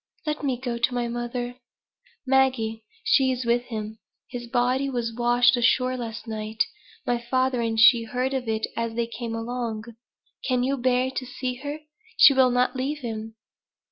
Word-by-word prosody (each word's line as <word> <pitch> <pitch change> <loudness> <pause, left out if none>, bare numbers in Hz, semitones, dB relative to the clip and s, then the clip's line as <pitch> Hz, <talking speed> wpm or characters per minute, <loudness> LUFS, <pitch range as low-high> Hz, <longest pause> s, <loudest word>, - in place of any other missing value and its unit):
"Let 300 -1 -2
me 265 -3 0
go 240 -2 -4
to 235 +2 +1
my 240 -1 0
mother." 240 +1 -4 0.7
"Maggie, 255 -4 +2 0.2
she 265 -9 +4
is 255 -1 -3
with 240 +1 +1
him. 220 -2 -6 0.3
His 240 -1 -6
body 255 +3 +1
was 240 -3 -2
washed 240 +1 +4
ashore 255 +1 +2
last 230 -3 -6
night. 220 0 -1 0.4
My 240 -1 0
father 255 0 +1
and 225 -1 -1
she 230 0 +7
heard 255 +4 -2
of 260 -3 -2
it 220 0 0
as 230 -1 -2
they 235 0 0
came 230 0 -5
along. 230 -1 -3 0.6
Can 250 -2 +2
you 270 +2 +1
bear 255 +1 +1
to 260 - -4
see 255 0 -3
her? 290 +3 -6 0.4
She 280 - +9
will 260 -1 +5
not 250 +1 +1
leave 280 +3 -2
him." 220 -1 -5
245 Hz, 170 wpm, -25 LUFS, 230-255 Hz, 0.7 s, She